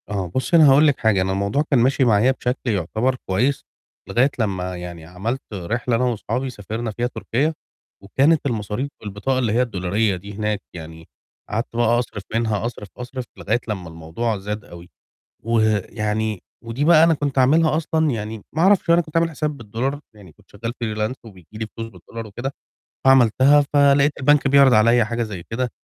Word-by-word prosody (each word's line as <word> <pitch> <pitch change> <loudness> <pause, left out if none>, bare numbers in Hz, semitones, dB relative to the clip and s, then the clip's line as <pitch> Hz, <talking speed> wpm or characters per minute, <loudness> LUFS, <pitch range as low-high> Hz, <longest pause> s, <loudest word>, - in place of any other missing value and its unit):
آه 100 -3 -2
بُصّي، 130 +6 +2
أنا 155 -3 +7
هاقول 145 +3 +6
لِك 145 - +1
حاجة، 110 -5 +2
أنا 95 +1 0
الموضوع 100 +9 0
كان 135 - +4
ماشي 130 +2 +3
معايا 115 +2 +4
بشكل 125 -1 -3
يُعتبر 110 +7 0
كويس 125 +9 0 0.4
لغاية 130 +4 +3
لمّا 95 -4 -2
يعني 85 -2 -8
عَمَلت 105 +10 -4
رحلة 115 +6 -2
أنا 120 - +1
واصحابي 125 +2 -2
سافرنا 110 0 -5
فيها 120 +3 -2
تركيا، 140 +5 -1 0.5
وكانت 140 +10 +2
المصاريف 115 +1 -2
بالبطاقة 105 +6 -2
اللي 115 -4 0
هي 120 - +3
الدولارية 100 -2 0
دي 100 +3 -9
هناك 105 0 -2
يعني، 80 -1 -10 0.4
قعدت 115 +2 -3
بقى 120 0 +3
أصرِف 105 -4 -5
منها 110 -2 0
أصرِف، 115 -3 -6
أصرِف 125 +1 -6
لغاية 115 +4 0
لمّا 95 -6 -4
الموضوع 85 +8 -3
زاد 105 +2 -5
أوي، 85 0 -12 0.5
ويعني 110 -2 0 0.2
ودي 115 +5 -2
بقى 160 0 +7
أنا 165 0 +4
كنت 145 -2 -2
عاملها 155 +4 +4
أصلًا 160 -1 0
يعني 110 -2 -5
ما 160 - -1
أعرَفش 190 -2 +4
أنا 170 +1 +6
كنت 160 -1 -6
عامل 165 0 +2
حساب 150 -1 -3
بالدولار، 125 +5 -3
يعني 100 -6 -15
كنت - - -27
شغال 115 0 -5
freelance 110 +2 -2
وبييجي 95 -7 -15
لي 110 - -3
فلوس 115 0 -5
بالدولار 115 0 -9
وكده، 120 +6 -5 0.5
فعملتها 135 +2 +5
فلقيت 140 0 +4
البنك 145 +1 +4
بيعرِض 140 -1 +6
عليَّ 115 +2 +5
حاجة 115 +2 -2
زي 105 -6 -5
كده 125 +2 -2
115 Hz, 175 wpm, -21 LUFS, 105-135 Hz, 0.5 s, أنا